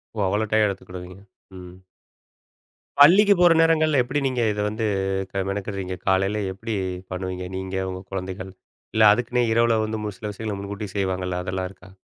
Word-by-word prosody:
ஓ. - - -10
அவ்வளோ 105 +3 0
டையம் 110 -1 +4
எடுத்துக்கிடுவீங்க? 90 -1 -7 0.4
ம். 90 0 -11 1.2
பள்ளிக்கு 200 +8 +8
போற 175 -1 +6
நேரங்கள்ல 155 -3 +3
எப்டி 135 +4 -2
நீங்க 125 -2 -1
இத 105 0 -3
வந்து 110 +1 -3 0.6
மெனக்கறீங்க? 100 -2 -4
காலையில 95 +2 +2
எப்டி 110 +3 -5 0.4
பண்ணுவீங்க? 90 0 -4
நீங்க 95 0 -5
உங்க 95 0 -6
குழந்தைகள். 95 0 -5 0.4
இல்ல 110 - +5
அதுக்குன்னே 120 +2 0
இரவுல 115 -1 +3
வந்து 110 0 -4
ஒரு 100 - -9
சில 105 -1 -4
விஷயங்கள 105 -1 -4
முன்கூட்டி 100 +1 -5
செய்வாங்கல்ல, 90 -2 -1
அதெல்லாம் 95 0 -3
இருக்கா? 95 -1 -17
100 Hz, 150 wpm, -23 LUFS, 95-115 Hz, 1.2 s, பள்ளிக்கு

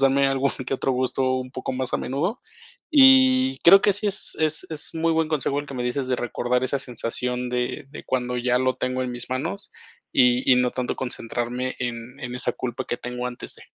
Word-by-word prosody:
darme 135 0 +4
algún 135 0 +1 0.2
que 135 - 0
otro 135 - -1
gusto 130 +1 0 0.2
un 130 0 -7
poco 130 0 -4
más 130 -1 -3
a - - +4
menudo 155 - -2 0.5
y 265 -2 +6
creo 195 +3 +8
que 205 - +3
sí, 205 +1 0
es 195 - -1
es 155 0 +1
es 155 0 -4
muy 165 0 +1
buen 160 -1 +1
consejo 145 -2 0
el 145 - -10
que 140 - -8
me 125 -1 -3
dices 130 +1 -2
de 125 - +1
recordar 120 +1 -1
esa 140 +2 0
sensación 125 0 -3
de 125 +2 -2
de 150 - -9
cuando 125 -1 -1
ya 125 0 +1
lo 130 -1 +1
tengo 130 0 -2
en 125 -1 -3
mis 120 0 -6
manos 130 -6 -4 0.4
y 125 +1 +3
y 125 - +7
no 125 -1 +2
tanto 125 -1 -3
concentrarme 125 +1 -3
en 120 0 -5
en 120 -1 -5
esa 125 - 0
culpa 125 +1 -4
que 120 - -3
tengo 125 0 -5
antes 125 - -5
de. - - -14
130 Hz, 220 wpm, -24 LUFS, 125-140 Hz, 0.5 s, creo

